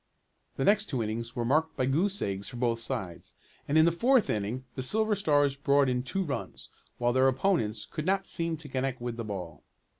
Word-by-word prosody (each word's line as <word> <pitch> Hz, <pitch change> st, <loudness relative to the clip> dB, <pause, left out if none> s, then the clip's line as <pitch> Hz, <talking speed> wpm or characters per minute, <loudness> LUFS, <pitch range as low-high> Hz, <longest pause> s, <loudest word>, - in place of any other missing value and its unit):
The 135 Hz, -, -1 dB
next 205 Hz, 0 st, +4 dB
two 130 Hz, -, -2 dB
innings 115 Hz, +2 st, -4 dB
were 120 Hz, -2 st, -1 dB
marked 155 Hz, +6 st, +1 dB
by 130 Hz, -, +1 dB
goose 180 Hz, +10 st, +1 dB
eggs 100 Hz, 0 st, -3 dB
for 125 Hz, -, -8 dB
both 120 Hz, -1 st, 0 dB
sides, 95 Hz, -6 st, -5 dB, 0.3 s
and 145 Hz, -, +2 dB
in 160 Hz, -, +7 dB
the 170 Hz, -, +4 dB
fourth 240 Hz, +8 st, +3 dB
inning 110 Hz, +5 st, -2 dB
the 130 Hz, -, -4 dB
Silver 215 Hz, +11 st, +1 dB
Stars 145 Hz, -8 st, +2 dB
brought 140 Hz, -1 st, +3 dB
in 125 Hz, 0 st, 0 dB
two 190 Hz, +9 st, -2 dB
runs, 140 Hz, -8 st, -5 dB, 0.3 s
while 120 Hz, 0 st, +1 dB
their 130 Hz, +1 st, +4 dB
opponents 130 Hz, -, +1 dB
could 155 Hz, +1 st, -5 dB
not 195 Hz, 0 st, +1 dB
seem 165 Hz, -1 st, -1 dB
to 155 Hz, -1 st, -10 dB
connect 130 Hz, -1 st, -2 dB
with 120 Hz, -1 st, -4 dB
the 115 Hz, -, -4 dB
ball. 90 Hz, -7 st, -6 dB
135 Hz, 210 wpm, -29 LUFS, 115-165 Hz, 0.3 s, in